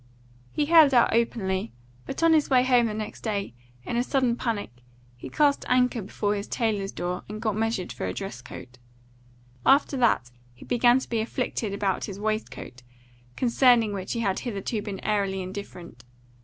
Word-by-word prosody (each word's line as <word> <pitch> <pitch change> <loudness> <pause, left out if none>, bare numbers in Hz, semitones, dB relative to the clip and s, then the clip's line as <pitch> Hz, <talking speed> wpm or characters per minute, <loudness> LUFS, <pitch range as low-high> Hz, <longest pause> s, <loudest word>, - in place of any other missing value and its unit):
He 295 - 0
held 310 -4 +6
out 240 - +4
openly, 190 - 0 0.4
but 300 - -4
on 330 -1 +6
his 310 -2 +3
way 255 -2 +4
home 250 -2 +4
the 215 - -3
next 215 -1 -6
day, 200 - -3 0.3
in 235 - -3
a 240 - +2
sudden 255 -2 +1
panic, 230 - -3 0.4
he 120 - -9
cast 290 -2 +2
anchor 250 -2 +2
before 205 +1 -2
his 200 0 -4
tailor's 210 -5 -1
door 180 +1 -4
and 210 +1 -6
got 215 -2 -1
measured 225 -4 -2
for - - -4
a - - -2
dress 195 -10 -6
coat. 125 0 -11 0.8
After 275 +1 +4
that 220 - +2 0.2
he 125 - -14
began 245 0 +4
to 260 - -4
be 230 - -1
afflicted 225 -2 -3
about 200 -1 -1
his 200 -1 -8
waist 215 +1 -1
coat, 125 - -10 0.5
concerning 240 -3 +3
which 190 -1 -4
he 230 - -2
had 195 -4 0
hitherto 215 -1 -3
been 200 -2 -6
airily 195 -3 0
indifferent. 180 - -9
220 Hz, 180 wpm, -26 LUFS, 195-245 Hz, 0.8 s, held